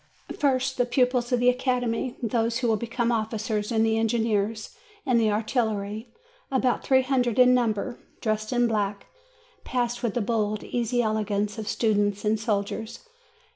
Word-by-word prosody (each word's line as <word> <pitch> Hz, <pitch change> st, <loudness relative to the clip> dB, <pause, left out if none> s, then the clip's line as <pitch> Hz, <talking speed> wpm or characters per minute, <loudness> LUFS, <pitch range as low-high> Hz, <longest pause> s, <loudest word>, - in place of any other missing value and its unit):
First, 265 Hz, -2 st, +1 dB
the 245 Hz, -, +3 dB
pupils 250 Hz, -1 st, +1 dB
of 250 Hz, -, +3 dB
the 245 Hz, +1 st, +5 dB
Academy, 250 Hz, -1 st, -1 dB
those 230 Hz, 0 st, 0 dB
who 255 Hz, -2 st, -1 dB
will 225 Hz, -, +3 dB
become 235 Hz, +2 st, -1 dB
officers 220 Hz, -1 st, -2 dB
in 220 Hz, -1 st, +2 dB
the 225 Hz, 0 st, +2 dB
Engineers 220 Hz, -1 st, 0 dB, 0.3 s
and 250 Hz, -3 st, +3 dB
the 220 Hz, -, +3 dB
Artillery, 215 Hz, 0 st, -2 dB, 0.4 s
about 260 Hz, -2 st, +1 dB
three 260 Hz, -1 st, +4 dB
hundred 250 Hz, -3 st, 0 dB
in 250 Hz, 0 st, +7 dB
number, 240 Hz, 0 st, 0 dB, 0.2 s
dressed 215 Hz, -1 st, -2 dB
in 245 Hz, -1 st, +3 dB
black, 205 Hz, -3 st, -1 dB, 0.6 s
passed 240 Hz, -1 st, -1 dB
with 235 Hz, -5 st, -2 dB
the 240 Hz, -, +1 dB
bold 215 Hz, -1 st, -1 dB
easy 240 Hz, 0 st, 0 dB
elegance 210 Hz, -1 st, -1 dB
of 215 Hz, -, -5 dB
students 205 Hz, -3 st, +1 dB
and 215 Hz, +1 st, +2 dB
soldiers. 220 Hz, -, -3 dB
230 Hz, 155 wpm, -26 LUFS, 215-245 Hz, 0.6 s, in